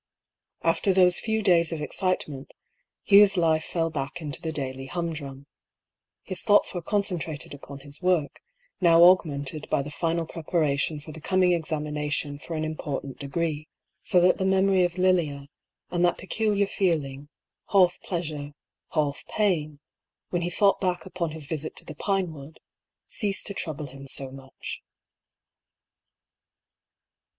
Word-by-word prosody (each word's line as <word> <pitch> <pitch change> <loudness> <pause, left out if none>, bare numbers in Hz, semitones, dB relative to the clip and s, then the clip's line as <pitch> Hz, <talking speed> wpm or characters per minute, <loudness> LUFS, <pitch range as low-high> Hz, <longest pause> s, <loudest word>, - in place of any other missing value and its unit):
After 165 +4 +2
those 180 -1 +5
few 220 -1 -1
days 170 -3 +4
of 165 - -3
excitement, 150 -4 -2 0.5
Hugh's 200 -1 +7
life 160 -2 +3
fell 165 -1 -1
back 140 -1 -4
into 150 -4 -3
the 160 - -3
daily 135 -3 -3
humdrum. 150 -5 -5 0.8
His 185 - -3
thoughts 205 -2 +4
were 175 - -3
con 205 +4 +1
centrated 165 -7 -4
upon 140 0 -10
his 145 +3 -8
work, 180 -6 +1 0.4
now 170 -1 +7
augmented 155 -5 +3
by 140 - +1
the 145 - -7
final 165 +2 -1
preparation 155 -2 -1
for 150 +2 -10
the 160 +1 -10
coming 185 +1 +3
examination 150 -3 -2
for 165 - -6
an 155 - -2
impor 155 -3 -3
tant 135 -2 -9
degree, 155 +1 -2 0.3
so 180 - +3
that 180 +1 +4
the - - 0
memory 190 -1 +4
of 175 0 -1
Lilia, 165 -7 +1 0.4
and 175 0 +1
that 175 - +3
pecul 210 +3 -1
iar 200 0 +3
feeling, 145 -8 -1 0.4
half 185 -3 +4
pleasure, 150 -5 -4 0.4
half 145 -3 0
pain, 155 -9 0 0.5
when 175 - 0
he 175 - -1
thought 195 +3 +3
back 180 -2 -1
upon 180 -3 -3
his 155 -1 -5
visit 155 +1 -4
to - - -10
the 155 - -7
Pinewood, 160 -4 -3 0.5
ceased 200 -3 +1
to 200 - -5
trouble 155 -5 -4
him 135 0 -11
so 135 0 -1
much. 135 0 -8
165 Hz, 150 wpm, -26 LUFS, 145-180 Hz, 0.8 s, Hugh's